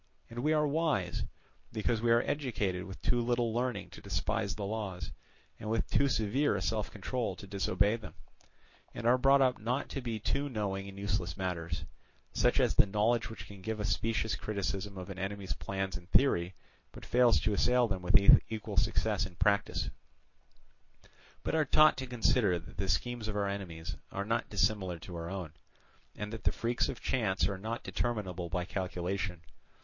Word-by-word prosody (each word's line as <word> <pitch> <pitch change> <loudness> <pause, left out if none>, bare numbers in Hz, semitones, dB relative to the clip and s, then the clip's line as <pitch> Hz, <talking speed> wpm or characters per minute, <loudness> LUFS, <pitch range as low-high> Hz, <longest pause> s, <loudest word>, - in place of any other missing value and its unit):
And 120 - -5
we 150 +5 +2
are 150 -1 +3
wise, 145 - 0 0.5
because 110 0 0
we 120 - +2
are 115 +1 +5
educated 105 -10 -1
with 95 - -9
too 120 -1 +2
little 120 -1 +1
learning 120 -3 -2
to - - -11
despise 100 +2 -1
the 105 - -4
laws, 100 -5 -4 0.5
and 105 - -5
with 115 0 0
too 140 - +4
severe 115 +3 +1
a 100 - -2
self 110 0 -1
control 110 -1 -3
to 95 - -10
disobey 100 +2 +1
them, 110 - -10 0.8
and 115 - -5
are 125 +2 +5
brought 135 +1 +6
up 130 -1 +2
not 125 +6 -1
to 135 - -4
be 115 -3 -3
too 140 +6 -1
knowing 100 -5 -2
in 100 0 -9
useless 100 -4 -2
matters—such 85 -4 -2
as - - +3
the - - +5
knowledge 110 +3 +1
which 110 - -8
can 100 -2 -12
give 110 +2 -3
a 105 - -1
specious 110 +2 0
criticism 100 -1 -3
of 90 +1 -6
an 95 - -7
enemy's 100 0 -3
plans 95 -3 -3
in 90 +1 -8
theory, 90 -7 +3 0.4
but - - -11
fails 120 -7 +5
to 110 - +1
assail 125 +3 +3
them 95 -3 -2
with 90 - +6 0.3
equal 110 -2 -5
success 105 0 +2
in 90 - -15
practice—but 100 +3 +1 1.6
are 160 -1 +4
taught 155 +2 +6
to 130 0 -4
consider 115 -5 +2
that 85 - -11
the 95 - -2
schemes 120 +5 0
of 105 - -3
our 100 -1 +1
enemies 85 -5 -5
are 100 +1 -3
not 115 +2 0
dissimilar 95 -3 +1
to 85 +2 -9
our 85 0 -4
own, 90 -5 -5 0.6
and 105 +1 -5
that 115 - -6
the - - +3
freaks 120 +1 0
of - - -5
chance 95 -8 +1
are 100 -2 -3
not 110 +4 -4
determinable 95 -7 -2
by 90 +1 -1
calculation. 90 -1 -3
105 Hz, 180 wpm, -32 LUFS, 95-120 Hz, 1.6 s, brought